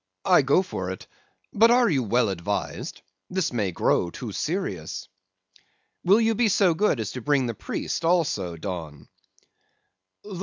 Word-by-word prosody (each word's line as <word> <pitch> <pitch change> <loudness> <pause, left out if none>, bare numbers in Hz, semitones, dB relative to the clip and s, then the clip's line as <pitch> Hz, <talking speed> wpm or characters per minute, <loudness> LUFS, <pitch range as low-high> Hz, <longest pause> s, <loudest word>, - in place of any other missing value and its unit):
I - - +6
go 140 +7 +3
for 95 - -5
it; 95 - -7 0.5
but 225 +3 +5
are 245 0 +5
you 145 -8 +2
well 120 0 +1
advised? 95 +2 -4 0.3
this 185 -7 -1
may 105 -6 0
grow 85 0 +1
too 115 +4 -7
serious.' 100 - -3 1.0
"'Will 195 +5 +5
you 225 0 +2
be 225 +1 +2
so 190 -3 +3
good 160 - +1
as 110 -1 -3
to 125 - -6
bring 140 +1 +2
the 120 - -2
priest 110 - -4
also, 150 - +1
Don? 80 -5 -7
130 Hz, 150 wpm, -25 LUFS, -, 1.0 s, I